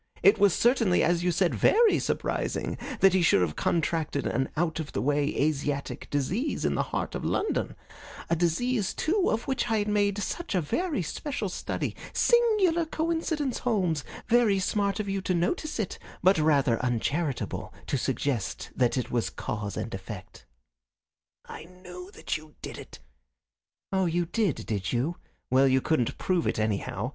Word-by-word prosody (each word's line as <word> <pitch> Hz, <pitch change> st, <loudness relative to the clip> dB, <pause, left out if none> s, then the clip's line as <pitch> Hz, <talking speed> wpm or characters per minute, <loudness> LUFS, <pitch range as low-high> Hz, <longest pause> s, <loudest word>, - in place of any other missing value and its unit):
It 200 Hz, +4 st, +6 dB
was 200 Hz, -3 st, +5 dB
certainly, 230 Hz, -7 st, +3 dB
as 175 Hz, +1 st, +2 dB
you 180 Hz, -, +2 dB
said, 175 Hz, +1 st, +2 dB
very 450 Hz, 0 st, +4 dB
surprising -, -, -2 dB, 0.3 s
that 195 Hz, -1 st, +6 dB
he 190 Hz, -, +3 dB
should 165 Hz, -, +4 dB
have 80 Hz, -4 st, 0 dB
contracted 160 Hz, -3 st, 0 dB
an 135 Hz, 0 st, 0 dB
out 165 Hz, 0 st, 0 dB
of 155 Hz, -2 st, -5 dB
the -, -, -1 dB
way 145 Hz, +1 st, +1 dB
Asiatic 145 Hz, -1 st, -1 dB
disease 180 Hz, -, -1 dB
in -, -, +2 dB
the -, -, +1 dB
heart -, -, -2 dB
of -, -, -4 dB
London 425 Hz, -, -1 dB, 0.5 s
a 170 Hz, -, +2 dB
disease, 190 Hz, +6 st, 0 dB
too, 370 Hz, +4 st, +1 dB
of 225 Hz, +2 st, 0 dB
which 265 Hz, -3 st, -1 dB
I 225 Hz, -, +2 dB
had 205 Hz, 0 st, 0 dB
made 205 Hz, -1 st, +2 dB
such 335 Hz, -, -3 dB
a -, -, +4 dB
very 290 Hz, -, -1 dB
special 220 Hz, -, -3 dB
study. -, -, -3 dB, 0.2 s
Singular 425 Hz, -9 st, +3 dB
coincidence, 320 Hz, -4 st, -1 dB
Holmes. 185 Hz, -, 0 dB, 0.2 s
Very 230 Hz, -4 st, +4 dB
smart 200 Hz, +1 st, 0 dB
of 210 Hz, -, -2 dB
you 195 Hz, 0 st, -1 dB
to 185 Hz, -1 st, 0 dB
notice 300 Hz, -, -1 dB
it, 210 Hz, -, -3 dB, 0.2 s
but 185 Hz, -1 st, +5 dB
rather 140 Hz, -7 st, +3 dB
uncharitable 135 Hz, +4 st, -1 dB
to -, -, -1 dB
suggest 125 Hz, -8 st, -2 dB
that 125 Hz, 0 st, +2 dB
it 125 Hz, -, -2 dB
was 120 Hz, -2 st, 0 dB
cause 105 Hz, -2 st, -4 dB
and 115 Hz, -, -4 dB
effect." 95 Hz, 0 st, -8 dB, 1.0 s
"I -, -, -9 dB
knew 180 Hz, +1 st, -11 dB
that -, -, -2 dB
you 155 Hz, -1 st, -15 dB
did -, -, -6 dB
it." -, -, -11 dB, 0.9 s
"Oh, 190 Hz, -2 st, +2 dB
you 175 Hz, +1 st, 0 dB
did, 190 Hz, -, -1 dB
did 105 Hz, -3 st, -2 dB
you? 135 Hz, +8 st, -1 dB, 0.3 s
Well, 135 Hz, +1 st, +5 dB
you 130 Hz, 0 st, +4 dB
couldn't 125 Hz, -4 st, 0 dB
prove 180 Hz, -3 st, 0 dB
it, -, -, 0 dB
anyhow. 110 Hz, +1 st, -1 dB
175 Hz, 170 wpm, -28 LUFS, 140-220 Hz, 1.0 s, It